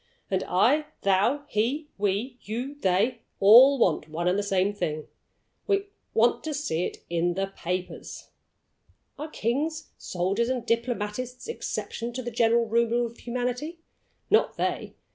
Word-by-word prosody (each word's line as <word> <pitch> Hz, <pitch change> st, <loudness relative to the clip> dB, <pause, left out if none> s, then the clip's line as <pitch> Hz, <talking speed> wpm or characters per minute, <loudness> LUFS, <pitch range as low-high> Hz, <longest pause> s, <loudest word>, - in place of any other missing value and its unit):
And 190 Hz, -1 st, +1 dB
I, 255 Hz, +12 st, +3 dB, 0.2 s
thou, 200 Hz, +9 st, +2 dB
he; 275 Hz, +6 st, 0 dB
we, 210 Hz, +6 st, -1 dB
you, 245 Hz, +7 st, -4 dB
they, 200 Hz, +6 st, +2 dB, 0.2 s
all 245 Hz, +8 st, +8 dB
want 160 Hz, -, +1 dB
one 170 Hz, +3 st, -2 dB
and 180 Hz, -, +3 dB
the 205 Hz, -, +1 dB
same 195 Hz, 0 st, +1 dB
thing 155 Hz, -6 st, -3 dB, 0.6 s
we 400 Hz, -1 st, +1 dB, 0.3 s
want 230 Hz, +2 st, +3 dB
to 310 Hz, -2 st, -2 dB
see 180 Hz, -, -1 dB
it -, -, -7 dB
in 170 Hz, +1 st, 0 dB
the 195 Hz, 0 st, -2 dB
papers. 180 Hz, +1 st, -5 dB, 0.9 s
Are 305 Hz, -, -4 dB
kings, 305 Hz, +6 st, -2 dB
soldiers, 195 Hz, +7 st, -1 dB
and 250 Hz, -3 st, -2 dB
diplomatists 235 Hz, -, -2 dB
exceptions 240 Hz, -, -4 dB
to 255 Hz, -, -3 dB
the 240 Hz, -, -4 dB
general 230 Hz, 0 st, +3 dB
rule 235 Hz, +1 st, +2 dB
of 235 Hz, 0 st, -8 dB
humanity? 250 Hz, +7 st, -3 dB, 0.5 s
Not 435 Hz, -, +3 dB
they! -, -, -2 dB
230 Hz, 145 wpm, -27 LUFS, 195-255 Hz, 0.9 s, all